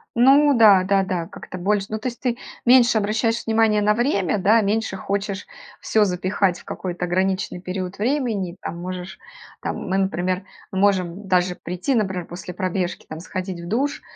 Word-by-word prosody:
Ну 275 Hz, +4 st, +6 dB
да, 200 Hz, -5 st, +7 dB
да, 195 Hz, 0 st, +2 dB
да, 180 Hz, -3 st, -2 dB
как-то 185 Hz, -, -9 dB
больше, 200 Hz, +2 st, 0 dB
ну, 215 Hz, -, -2 dB
то 220 Hz, -, -4 dB
есть, 240 Hz, -, -12 dB
ты 245 Hz, -2 st, -1 dB, 0.3 s
меньше 240 Hz, -2 st, +6 dB
обращаешь 225 Hz, +2 st, 0 dB
внимание 220 Hz, -2 st, +3 dB
на 210 Hz, +1 st, +3 dB
время, 210 Hz, -, +1 dB
да, 215 Hz, +5 st, +5 dB
меньше 210 Hz, -1 st, -1 dB
хочешь 200 Hz, 0 st, -3 dB, 0.3 s
всё 220 Hz, -, +2 dB
запихать 185 Hz, -1 st, 0 dB
в -, -, -17 dB
какой-то 180 Hz, -1 st, -4 dB
ограниченный 185 Hz, +1 st, -1 dB
период 185 Hz, 0 st, -5 dB
времени. 220 Hz, -7 st, -1 dB
Там, 170 Hz, -, -5 dB
можешь, 180 Hz, +1 st, -6 dB, 0.4 s
там, -, -, -3 dB
мы, 190 Hz, +1 st, 0 dB
например, 185 Hz, -1 st, 0 dB, 0.3 s
мы 190 Hz, -, -2 dB
можем 195 Hz, -1 st, +1 dB
даже 180 Hz, -1 st, +2 dB
прийти, 180 Hz, +10 st, -2 dB
например, 190 Hz, -5 st, -1 dB
после 180 Hz, +1 st, -8 dB
пробежки, 185 Hz, -1 st, -2 dB
там, 160 Hz, +1 st, -7 dB
сходить 185 Hz, -1 st, -5 dB
в 170 Hz, -, -8 dB
душ 275 Hz, +6 st, -1 dB
195 Hz, 175 wpm, -22 LUFS, 185-220 Hz, 0.4 s, да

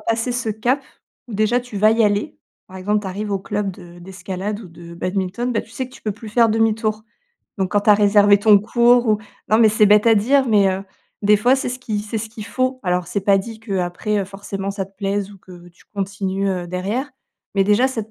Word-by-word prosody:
passé 225 Hz, +3 st, -1 dB
ce 240 Hz, -2 st, -3 dB
cap, 240 Hz, +6 st, 0 dB, 0.5 s
déjà, 215 Hz, +2 st, +1 dB
tu 245 Hz, -4 st, -9 dB
vas 215 Hz, +2 st, +4 dB
y 230 Hz, 0 st, +2 dB
aller. 205 Hz, -, 0 dB, 0.3 s
Par 190 Hz, -, -12 dB
exemple, 205 Hz, +3 st, 0 dB
t'arrives 205 Hz, +2 st, -5 dB
au 200 Hz, -, 0 dB
club 205 Hz, 0 st, -3 dB
de 175 Hz, -2 st, -13 dB
d'escalade 190 Hz, +3 st, -6 dB
ou 200 Hz, -, -11 dB
de 170 Hz, 0 st, -12 dB
badminton, 190 Hz, +7 st, -2 dB
bah, 220 Hz, -, 0 dB
tu -, -, -16 dB
sais 260 Hz, +2 st, -4 dB
que 255 Hz, -, -18 dB
tu -, -, -15 dB
peux 210 Hz, -, -2 dB
plus 215 Hz, +2 st, -11 dB
faire 230 Hz, +2 st, +3 dB
demi-tour. 220 Hz, -1 st, 0 dB, 0.6 s
Donc, 190 Hz, -2 st, -1 dB
quand 205 Hz, -, +3 dB
t'as 210 Hz, +1 st, +5 dB
réservé 205 Hz, 0 st, +5 dB
ton 205 Hz, 0 st, +6 dB
cours 240 Hz, +3 st, +3 dB
ou 215 Hz, -1 st, +3 dB, 0.3 s
non, 215 Hz, -, +4 dB
mais 225 Hz, -1 st, +6 dB
c'est 215 Hz, 0 st, +4 dB
bête 210 Hz, +2 st, +5 dB
à 225 Hz, -, +6 dB
dire, 265 Hz, +6 st, +3 dB
mais, 205 Hz, -3 st, +4 dB
heu, 190 Hz, +1 st, -4 dB, 0.4 s
des 210 Hz, +1 st, +5 dB
fois, 245 Hz, +5 st, +3 dB
c'est 265 Hz, -, -3 dB
ce 250 Hz, +1 st, -5 dB
qui 220 Hz, -5 st, -3 dB
c'est 215 Hz, +2 st, -4 dB
ce 220 Hz, +1 st, -5 dB
qu'il 215 Hz, -1 st, -9 dB
faut. 255 Hz, +1 st, -1 dB
Alors, 180 Hz, -2 st, -1 dB
c'est 180 Hz, +3 st, -2 dB
pas 195 Hz, 0 st, +3 dB
dit 220 Hz, +3 st, -7 dB
qu'après, 195 Hz, 0 st, -2 dB
heu, 200 Hz, -, -1 dB
forcément, 195 Hz, 0 st, -6 dB
ça 200 Hz, -1 st, -4 dB
te 195 Hz, 0 st, -27 dB
plaise 200 Hz, 0 st, -2 dB
ou 200 Hz, -, -15 dB
que 175 Hz, -1 st, -14 dB
tu 175 Hz, -, -24 dB
continues, 195 Hz, 0 st, -2 dB
heu, 180 Hz, -2 st, -2 dB
derrière. 200 Hz, +10 st, -3 dB, 0.5 s
Mais 195 Hz, -, +4 dB
déjà, 210 Hz, +6 st, +3 dB
cette 225 Hz, -4 st, -5 dB
205 Hz, 230 wpm, -20 LUFS, 195-225 Hz, 0.6 s, ton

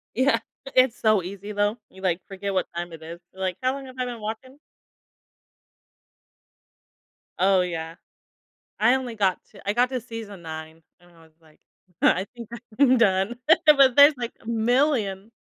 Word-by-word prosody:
Yeah. 260 Hz, +3 st, +3 dB, 0.4 s
It's 255 Hz, -2 st, +4 dB
so 215 Hz, -4 st, +3 dB
easy, 200 Hz, +3 st, -7 dB
though. 205 Hz, +2 st, 0 dB
You, 190 Hz, -, -16 dB
like, 185 Hz, -2 st, 0 dB
forget 195 Hz, 0 st, -5 dB
what 185 Hz, -, 0 dB
time 175 Hz, 0 st, -4 dB
it 165 Hz, -1 st, -11 dB
is, 165 Hz, +2 st, -9 dB
you're 190 Hz, -, -12 dB
like, 185 Hz, -2 st, -2 dB
"How 255 Hz, +1 st, +2 dB
long 275 Hz, 0 st, -7 dB
have 255 Hz, -1 st, -12 dB
I 255 Hz, -, -1 dB
been 240 Hz, -2 st, -6 dB
watching?" 225 Hz, +6 st, -7 dB, 2.8 s
Oh, 190 Hz, 0 st, +4 dB
yeah. 165 Hz, -2 st, -4 dB, 0.8 s
I 240 Hz, +4 st, +4 dB
only 255 Hz, -3 st, -4 dB
got 195 Hz, -4 st, +1 dB
to 200 Hz, -, -15 dB
I 205 Hz, -, +1 dB
got 245 Hz, +2 st, +2 dB
to 260 Hz, -1 st, -2 dB
season 225 Hz, -5 st, -9 dB
9, 160 Hz, 0 st, -9 dB, 0.2 s
and 175 Hz, 0 st, -22 dB
I 165 Hz, -1 st, -21 dB
was 160 Hz, -1 st, -21 dB
like, 155 Hz, -1 st, -24 dB, 0.4 s
"I 185 Hz, -, +3 dB
think 235 Hz, -2 st, -9 dB, 0.3 s
I'm 260 Hz, -2 st, +5 dB
done," 195 Hz, 0 st, +2 dB, 0.3 s
but 275 Hz, -4 st, +6 dB
there's, 285 Hz, +2 st, +9 dB
like, 240 Hz, -1 st, -4 dB
a -, -, -16 dB
million. 230 Hz, -3 st, 0 dB
210 Hz, 170 wpm, -24 LUFS, 185-245 Hz, 2.8 s, there's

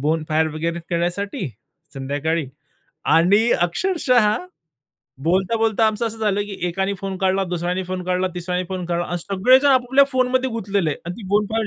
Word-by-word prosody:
bonfire 155 Hz, +1 st, +1 dB
वगैरे 170 Hz, +2 st, -2 dB
करण्यासाठी 175 Hz, 0 st, -2 dB, 0.5 s
संध्याकाळी 145 Hz, +3 st, -2 dB, 0.7 s
आणि 200 Hz, +8 st, +4 dB
अक्षरशः 245 Hz, -, +2 dB, 0.9 s
बोलता-बोलता 220 Hz, +6 st, +2 dB
आमचं 220 Hz, +2 st, 0 dB
असं 225 Hz, 0 st, -6 dB
झालं 205 Hz, -2 st, +1 dB
की 205 Hz, -1 st, -7 dB
एकाने 195 Hz, +3 st, -1 dB
फोन 195 Hz, -1 st, -4 dB
काढला, 190 Hz, 0 st, +1 dB
दुसऱ्याने 180 Hz, +1 st, -2 dB
फोन 185 Hz, 0 st, -4 dB
काढला, 185 Hz, +1 st, 0 dB
तिसऱ्याने 180 Hz, +1 st, -2 dB
फोन 185 Hz, -1 st, -4 dB
काढला 175 Hz, 0 st, -1 dB
अन 175 Hz, -, -3 dB
सगळेजण 205 Hz, -, +3 dB
आपापल्या 260 Hz, +1 st, +4 dB
फोनमध्ये 255 Hz, 0 st, +1 dB
गुतलेले 200 Hz, -7 st, -1 dB
आणि 170 Hz, +4 st, -6 dB
ती 210 Hz, -5 st, -9 dB
बोनफायर 215 Hz, +2 st, +1 dB
190 Hz, 145 wpm, -21 LUFS, 175-220 Hz, 0.9 s, आणि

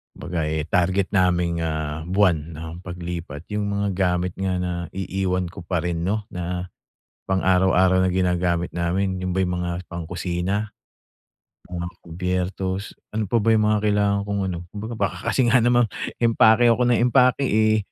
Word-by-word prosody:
baga 85 Hz, -2 st, -3 dB
eh, 80 Hz, 0 st, -1 dB
target 95 Hz, +1 st, +1 dB
naming, 90 Hz, -3 st, +2 dB
ah, 80 Hz, -1 st, -3 dB
buwan 85 Hz, -5 st, +1 dB
ng 80 Hz, +2 st, -7 dB
paglipat, 85 Hz, -3 st, -6 dB
yung 105 Hz, 0 st, -1 dB
mga 100 Hz, 0 st, 0 dB
gamit 90 Hz, -1 st, +1 dB
nga 95 Hz, -1 st, 0 dB
na 90 Hz, 0 st, -2 dB, 0.2 s
iiwan 95 Hz, -1 st, -1 dB
ko 95 Hz, -1 st, -9 dB
pa 85 Hz, -3 st, 0 dB
rin 85 Hz, -1 st, -2 dB
'no 105 Hz, +2 st, 0 dB
na 90 Hz, 0 st, -4 dB, 0.6 s
pang-araw-araw 95 Hz, -1 st, +3 dB
na -, -, +1 dB
ginagamit 90 Hz, -2 st, +1 dB
namin, 95 Hz, +3 st, -1 dB
yun 90 Hz, 0 st, -2 dB
ba 95 Hz, -, +1 dB
yung 90 Hz, -1 st, 0 dB
mga 90 Hz, 0 st, -3 dB
pangkusina, 90 Hz, +4 st, -3 dB, 1.0 s
mga 85 Hz, -1 st, -4 dB, 0.2 s
kubyertos, 90 Hz, +3 st, -3 dB, 0.2 s
ano 110 Hz, 0 st, -1 dB
pa 115 Hz, +5 st, +2 dB
ba 115 Hz, -, +3 dB
yung 110 Hz, -1 st, +3 dB
mga 105 Hz, 0 st, +3 dB
kailangan 105 Hz, -1 st, +2 dB
kong 100 Hz, -1 st, -1 dB
ano. 85 Hz, -, -4 dB
Kumbaga, 110 Hz, +3 st, -6 dB
baka -, -, 0 dB
kasi 130 Hz, -3 st, +2 dB
nga 120 Hz, -, +6 dB
naman, 120 Hz, -1 st, +4 dB, 0.3 s
empake 115 Hz, 0 st, +5 dB
ako 120 Hz, +2 st, +2 dB
ng 120 Hz, -, +3 dB
empake 125 Hz, +1 st, +4 dB
eh, 110 Hz, 0 st, +3 dB
90 Hz, 160 wpm, -23 LUFS, 85-100 Hz, 1.0 s, nga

